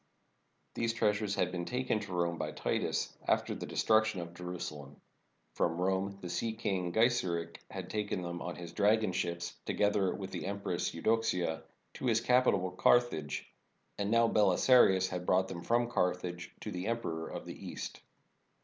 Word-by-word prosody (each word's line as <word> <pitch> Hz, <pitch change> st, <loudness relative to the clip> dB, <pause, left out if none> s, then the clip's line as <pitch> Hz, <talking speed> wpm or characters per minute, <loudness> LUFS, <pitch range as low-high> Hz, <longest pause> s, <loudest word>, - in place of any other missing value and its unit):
These 115 Hz, 0 st, 0 dB
treasures 105 Hz, -2 st, +1 dB
had 90 Hz, -, +1 dB
been 90 Hz, -1 st, -3 dB
taken 125 Hz, -1 st, 0 dB
to 100 Hz, -2 st, -8 dB
Rome 85 Hz, -1 st, 0 dB
by 75 Hz, -1 st, -3 dB
Titus, -, -, -1 dB
after -, -, +2 dB
the -, -, -6 dB
destruction 110 Hz, -2 st, +2 dB
of 85 Hz, 0 st, -6 dB
Jerusa 90 Hz, -1 st, -5 dB
lem. 70 Hz, -1 st, -12 dB, 0.5 s
From 85 Hz, 0 st, 0 dB
Rome 95 Hz, +2 st, 0 dB
the 90 Hz, -, -5 dB
sea 110 Hz, +4 st, -1 dB
king 95 Hz, -5 st, -1 dB
Geiseric 90 Hz, -7 st, +1 dB
had -, -, -6 dB
taken 105 Hz, -3 st, -2 dB
them 85 Hz, 0 st, -5 dB
on 90 Hz, -, -4 dB
his 85 Hz, -1 st, -8 dB
dragon 105 Hz, 0 st, +3 dB
ships, 85 Hz, -1 st, -2 dB
together 100 Hz, -2 st, +1 dB
with 95 Hz, -1 st, -6 dB
the -, -, -4 dB
Empress 100 Hz, -3 st, -2 dB
Eudoxia, 90 Hz, -4 st, +1 dB, 0.3 s
to -, -, -6 dB
his 115 Hz, -2 st, +4 dB
capital, 115 Hz, -7 st, +3 dB
Carthage. 90 Hz, -5 st, +2 dB, 0.5 s
And 100 Hz, 0 st, 0 dB
now 115 Hz, +1 st, +5 dB
Belisarius 100 Hz, -1 st, +5 dB
had 90 Hz, -1 st, -4 dB
brought 95 Hz, +1 st, +3 dB
them 90 Hz, -2 st, -6 dB
from 120 Hz, +4 st, +2 dB
Carthage 90 Hz, -5 st, -1 dB
to -, -, -5 dB
the 90 Hz, +2 st, -4 dB
Emperor 85 Hz, -9 st, -2 dB
of -, -, -6 dB
the -, -, -6 dB
East. -, -, -6 dB
95 Hz, 165 wpm, -32 LUFS, 90-110 Hz, 0.5 s, now